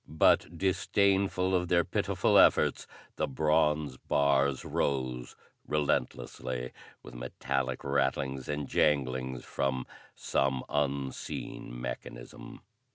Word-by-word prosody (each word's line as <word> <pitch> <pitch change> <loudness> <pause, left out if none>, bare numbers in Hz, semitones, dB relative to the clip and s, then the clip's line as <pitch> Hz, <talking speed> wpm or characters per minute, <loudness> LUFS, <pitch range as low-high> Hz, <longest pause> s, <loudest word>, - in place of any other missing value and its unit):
But, 80 +2 +3
disdainful 95 0 +1
of 90 -1 +1
their 85 0 +3
pitiful - - +2
efforts, - - +4 0.3
the - - 0
bronze 75 -1 +1
bars 70 -1 +1
rose 65 -3 -2 0.3
relentlessly 65 -4 -2 0.3
with 60 - -11
metallic 65 +1 -3
rattlings 70 -1 -1
and 75 -1 -2
janglings 65 -3 0
from 65 -2 -2 0.3
some 65 -1 0
unseen 70 -3 -3
mechanism. - - -8
70 Hz, 95 wpm, -30 LUFS, 65-75 Hz, 0.3 s, efforts